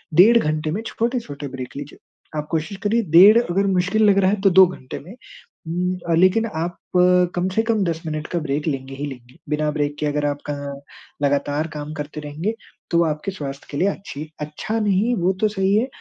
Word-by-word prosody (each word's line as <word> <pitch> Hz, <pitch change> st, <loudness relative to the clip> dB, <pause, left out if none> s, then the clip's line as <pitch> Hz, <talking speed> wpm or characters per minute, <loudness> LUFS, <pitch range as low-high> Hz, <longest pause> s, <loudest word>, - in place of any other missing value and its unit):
डेढ़ 220 Hz, +8 st, +7 dB
घंटे 155 Hz, -4 st, 0 dB
में 200 Hz, +7 st, -2 dB
छोटे-छोटे 225 Hz, -, -3 dB
ब्रेक 130 Hz, -1 st, -7 dB
लीजिए। 145 Hz, 0 st, -8 dB, 0.4 s
आप 150 Hz, 0 st, -3 dB
कोशिश 165 Hz, +5 st, -2 dB
करिए 225 Hz, +3 st, +2 dB
डेढ़ 200 Hz, +7 st, +9 dB
अगर 195 Hz, -3 st, 0 dB
मुश्किल 190 Hz, +3 st, +2 dB
लग 200 Hz, -, +4 dB
रहा 190 Hz, -1 st, +3 dB
है, 205 Hz, -1 st, -1 dB
तो 195 Hz, -, +5 dB
2 190 Hz, +1 st, +8 dB
घंटे 130 Hz, -7 st, -8 dB
में, 185 Hz, +9 st, -12 dB, 0.5 s
उम, 180 Hz, +2 st, -1 dB
अ, -, -, +3 dB
लेकिन 185 Hz, +6 st, +4 dB
आप 170 Hz, +2 st, -3 dB, 0.6 s
कम 180 Hz, +1 st, 0 dB
से 225 Hz, -, +4 dB
कम 225 Hz, -3 st, +1 dB
10 165 Hz, -1 st, -2 dB
मिनट 155 Hz, -1 st, -4 dB
का 175 Hz, -, -2 dB
ब्रेक 150 Hz, 0 st, -2 dB
लेंगे 135 Hz, -2 st, -3 dB
ही 140 Hz, +2 st, -4 dB
लेंगे। 125 Hz, -2 st, -10 dB
बिना 150 Hz, 0 st, 0 dB
ब्रेक 145 Hz, -1 st, -1 dB
के -, -, -1 dB
अगर 145 Hz, 0 st, 0 dB
आप 145 Hz, 0 st, -1 dB
कँ 140 Hz, -1 st, -5 dB, 0.4 s
लगातार 145 Hz, +2 st, +1 dB
काम 150 Hz, +1 st, -6 dB
करते 150 Hz, 0 st, -6 dB
रहेंगे, 155 Hz, +8 st, -3 dB, 0.4 s
तो 170 Hz, 0 st, +4 dB
आपके 155 Hz, +4 st, -2 dB
स्वास्थ्य 140 Hz, -6 st, -7 dB
के 140 Hz, -, -4 dB
लिए 185 Hz, -, +2 dB
अच्छी 155 Hz, -6 st, -5 dB
अच्छा 150 Hz, +9 st, -3 dB
नहीं, 210 Hz, +3 st, +2 dB
वो 185 Hz, -1 st, +1 dB
तो 215 Hz, -, +4 dB
सही 195 Hz, -1 st, +1 dB
है, 230 Hz, +5 st, +2 dB
165 Hz, 205 wpm, -21 LUFS, 145-195 Hz, 0.6 s, डेढ़